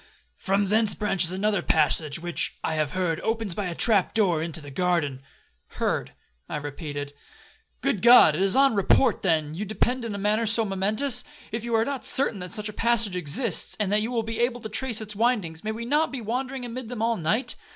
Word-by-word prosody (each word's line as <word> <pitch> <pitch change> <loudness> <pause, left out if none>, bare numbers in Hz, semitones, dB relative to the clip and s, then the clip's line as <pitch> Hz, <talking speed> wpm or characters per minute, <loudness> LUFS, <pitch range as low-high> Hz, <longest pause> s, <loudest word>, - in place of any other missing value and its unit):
From 195 +1 0
thence 215 0 +2
branches 195 -5 +1
another 200 +1 0
passage, 155 -1 +1
which, 175 0 -2
I - - -1
have 155 -2 -2
heard, 180 -4 -1
opens 225 -4 -2
by 200 +1 -3
a 170 - -5
trap 210 -2 +3
door 180 -8 +2
into 165 0 -2
the 145 -2 -11
garden.'—'Heard,' 145 -5 -3 0.4
I - - -4
repeated; 145 -1 -6 0.7
'Good 190 - -1
God! 235 -10 +7
is 190 +3 +2
it - - +2
on 275 -2 +4
report, 215 +4 +2
then, 155 -5 0
you 180 +6 -4
depend 235 +5 -1
in 225 -3 -4
a - - -4
matter 210 +3 0
so 225 +1 +2
momentous? 215 +7 +2 0.3
If 225 0 -4
you 235 -1 -1
are 225 0 +2
not 280 -1 -4
certain 255 -6 +5
that 180 -1 -7
such 210 +2 -3
a 215 - -7
passage 230 -4 +1
exists, 180 - -1
and 205 -2 -1
that 210 +1 +2
you 220 - -3
will 235 -2 -1
be 225 +1 -5
able 240 0 0
to 220 - -7
trace 225 +1 +1
its 215 -1 -7
windings, 205 -8 -1
may 215 - -2
we 230 +2 -6
not 300 +5 +1
be 270 - -5
wandering 250 +3 -4
amid 240 0 -7
them 240 -3 -4
all 230 0 +1
night? 215 +8 -1
210 Hz, 210 wpm, -25 LUFS, 175-230 Hz, 0.7 s, God